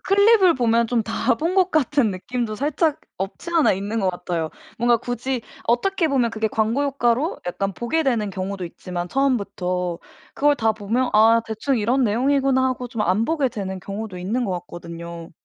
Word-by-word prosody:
클립을 400 -2 +5
보면 235 -2 +2
좀 235 -1 +1
다 230 +2 +1
본 330 +8 -1
것 375 -1 +3
같은 280 -6 +2
느낌도 215 +4 -3
살짝 300 +4 0 0.2
없지 195 - -5
않아 325 -3 +5
있는 205 +4 -2
것 190 -2 +2
같아요. 170 -3 -3 0.3
뭔가 240 0 +4
굳이 245 +1 -3 0.2
어떻게 325 +9 +1
보면 255 -5 +2
그게 220 0 -1
광고 225 +6 0
효과로 275 +1 0
약간 195 +3 -2
보게 240 - -1
되는 230 -8 0
경우도 190 0 -4
있지만 175 +1 -6
처음부터 185 -9 -1 0.4
그걸 290 0 +3
다 220 -3 +2
보면 225 +4 -1
'아 225 +2 +6
대충 225 +4 -1
이런 245 +6 +2
내용이구나.' 260 +4 +2
하고 250 -1 -4
좀 230 -2 -5
안 200 +4 +2
보게 295 -1 +1
되는 195 -6 -5
경우도 200 0 -6
있는 215 +8 -1
것 200 - -2
같거든요. 170 -1 -9
230 Hz, 355 characters per minute, -22 LUFS, 195-270 Hz, 0.4 s, 아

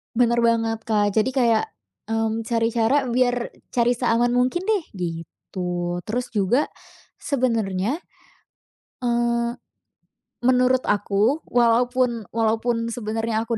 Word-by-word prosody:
Bener 235 0 +3
banget, 225 -1 +1
Kak. 205 -3 +1
Jadi 225 +4 +2
kayak, 235 -4 +2 0.4
mmm, 225 0 0
cari 230 0 +1
cara 235 +4 +1
biar 245 0 +2 0.4
cari 240 0 +2
seaman 240 0 +1
mungkin 255 +9 +1
deh, 420 -5 +2
gitu. 175 0 -4
Terus 245 +3 -3
juga, 210 +8 +2 0.5
sebenernya, 230 -4 -1 1.1
eee, 240 -1 +1 1.1
menurut 255 0 +3
aku, 210 +8 +1
walaupun 240 -1 +2
walaupun 230 +1 0
sebenernya 225 0 -2
aku 230 0 -2
230 Hz, 105 wpm, -23 LUFS, 220-245 Hz, 1.1 s, Bener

